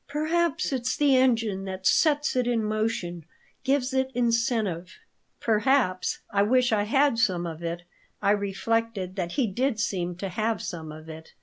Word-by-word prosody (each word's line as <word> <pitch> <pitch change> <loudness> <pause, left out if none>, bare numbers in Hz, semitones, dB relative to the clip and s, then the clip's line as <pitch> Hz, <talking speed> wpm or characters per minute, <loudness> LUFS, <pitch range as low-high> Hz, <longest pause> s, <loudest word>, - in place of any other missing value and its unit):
"Perhaps 310 +1 0
it's 255 -1 -1
the 290 -3 +4
engine 225 -7 +2
that 190 0 -6
sets 295 - +3
it 250 -1 +1
in 235 -2 +1
motion, 215 -6 -2 0.4
gives 265 -1 +1
it 265 0 +1
incentive." 225 -7 0 0.4
"Perhaps. 220 -4 +1
I 200 - +2
wish 245 +4 +3
I 205 -2 +2
had 270 +1 +2
some 185 -7 +1
of 165 -1 -6
it." 170 +1 -4 0.4
I 200 -1 +2
reflected 205 -1 -1
that 175 -2 -2
he 270 - +1
did 235 +3 -1
seem 180 -5 -1
to 195 +2 -5
have 215 +2 -1
some 160 -3 -6
of 155 +1 -11
"it." 160 0 -10
220 Hz, 165 wpm, -26 LUFS, 185-255 Hz, 0.4 s, the